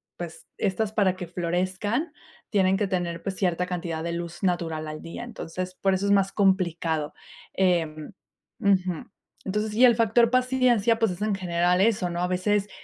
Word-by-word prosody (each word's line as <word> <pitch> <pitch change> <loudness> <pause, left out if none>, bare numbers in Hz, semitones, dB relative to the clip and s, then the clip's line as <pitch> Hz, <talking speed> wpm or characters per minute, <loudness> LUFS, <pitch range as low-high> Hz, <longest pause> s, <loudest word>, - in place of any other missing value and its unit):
pues 170 -2 -8
estas 205 +2 -1
para 190 -4 +2
que 180 -2 -6
florezcan 185 - -2 0.4
tienen 190 -1 +3
que 205 0 0
tener, 175 -3 -2
pues 195 -1 -3
cierta 180 -2 0
cantidad 170 -3 -4
de 170 - -2
luz 170 0 -5
natural 165 -4 -1
al 155 0 -6
día, 165 +8 -7
entonces 185 -5 -6
por 195 -1 +3
eso 190 +1 0
es 200 - +2
más 195 -1 +3
complicado, 170 -6 +1 0.4
eh 180 -4 +2 0.7
Ujú, 185 -2 +2 0.5
entonces 210 +2 -2
y 230 +4 +3
el 245 -2 +7
factor 230 +1 +4
paciencia, 250 -3 +3
pues 225 -3 +2
es 180 +2 -7
en 210 -1 +1
general 180 -1 +1
eso, 195 -4 +2
¿no? 175 0 -3
A 180 - +1
veces, 200 +3 0
185 Hz, 175 wpm, -26 LUFS, 175-210 Hz, 0.7 s, el